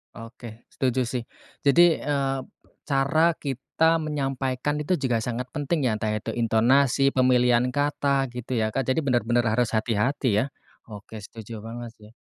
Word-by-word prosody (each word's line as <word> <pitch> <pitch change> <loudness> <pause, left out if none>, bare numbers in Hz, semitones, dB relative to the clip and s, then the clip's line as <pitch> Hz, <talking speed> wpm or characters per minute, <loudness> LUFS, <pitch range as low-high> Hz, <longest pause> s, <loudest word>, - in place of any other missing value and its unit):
Oke, 115 0 -11
setuju 130 -1 0
sih, 120 0 -3 0.4
jadi, 170 +3 +5
eee, 135 -2 -1 0.5
cara 155 +4 +2
kita 155 +5 0
menyampaikan 140 -1 -2
itu 165 +5 0
juga 125 -7 0
sangat 125 +2 -4
penting 150 +1 -1
ya 125 - +2
entah 110 - -2
itu 110 +1 -4
intonasi, 125 +4 +3
pemilihan 125 -1 +3
kata, 140 -2 0
gitu 125 +1 -5
ya, 110 -1 0
Kak, 135 +2 -2
jadi 130 - +2
bener-bener 120 -2 +1
harus 115 +1 +1
hati-hati 110 +1 +1
ya. 120 - +1 0.4
Oke, 110 0 -10
setuju 110 +1 -9
banget 115 +2 -8
sih. 105 0 -15
125 Hz, 145 wpm, -25 LUFS, 115-140 Hz, 0.5 s, jadi